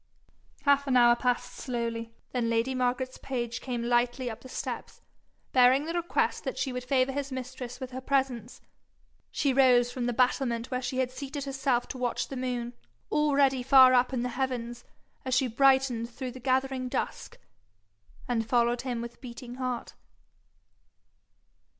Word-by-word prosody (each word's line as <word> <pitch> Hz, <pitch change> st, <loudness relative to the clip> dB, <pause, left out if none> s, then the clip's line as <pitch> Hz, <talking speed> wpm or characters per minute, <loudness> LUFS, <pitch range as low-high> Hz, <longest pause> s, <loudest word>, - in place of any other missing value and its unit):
Half 280 Hz, 0 st, +3 dB
an 255 Hz, -2 st, +3 dB
hour 240 Hz, -1 st, +6 dB
passed 245 Hz, 0 st, -1 dB
slowly 230 Hz, -2 st, -4 dB, 0.2 s
then 240 Hz, -2 st, 0 dB
lady 230 Hz, +3 st, +1 dB
Margaret's 255 Hz, 0 st, -1 dB
page 240 Hz, -3 st, -4 dB
came 245 Hz, -3 st, -3 dB
lightly 240 Hz, +1 st, +1 dB
up 220 Hz, -, -9 dB
the 260 Hz, -, -12 dB
steps, -, -, -6 dB, 0.5 s
bearing 260 Hz, +3 st, +5 dB
the 330 Hz, -, -3 dB
request 345 Hz, 0 st, 0 dB
that -, -, -4 dB
she 265 Hz, -, -2 dB
would 250 Hz, 0 st, -4 dB
favour 260 Hz, 0 st, +2 dB
his 280 Hz, 0 st, -4 dB
mistress 250 Hz, -1 st, -6 dB
with 260 Hz, -1 st, -6 dB
her 260 Hz, +1 st, -6 dB
presence. 260 Hz, -4 st, -1 dB, 0.7 s
She 280 Hz, -2 st, 0 dB
rose 250 Hz, -2 st, +5 dB
from 245 Hz, -1 st, -3 dB
the -, -, +1 dB
battlement 245 Hz, -1 st, +1 dB
where 255 Hz, 0 st, -1 dB
she 255 Hz, 0 st, -3 dB
had 255 Hz, -1 st, 0 dB
seated 280 Hz, +2 st, -6 dB
herself 265 Hz, -3 st, 0 dB
to 260 Hz, -, -6 dB
watch 245 Hz, -2 st, -1 dB
the 270 Hz, -, -5 dB
moon, 245 Hz, -2 st, -3 dB, 0.4 s
already 280 Hz, -3 st, +3 dB
far 260 Hz, 0 st, +7 dB
up 250 Hz, +1 st, +3 dB
in 250 Hz, -2 st, -1 dB
the 250 Hz, -, -1 dB
heavens, 245 Hz, -2 st, -3 dB, 0.4 s
as 260 Hz, -1 st, 0 dB
she 260 Hz, -, +3 dB
brightened 265 Hz, -1 st, +3 dB
through 255 Hz, +1 st, -6 dB
the 255 Hz, -, -10 dB
gathering 260 Hz, 0 st, 0 dB
dusk, -, -, -4 dB, 0.9 s
and 225 Hz, -2 st, -1 dB
followed 240 Hz, 0 st, +2 dB
him 245 Hz, -3 st, -3 dB
with 235 Hz, 0 st, -8 dB
beating 245 Hz, -1 st, -9 dB
heart. 255 Hz, -2 st, -3 dB
255 Hz, 160 wpm, -28 LUFS, 240-265 Hz, 0.9 s, far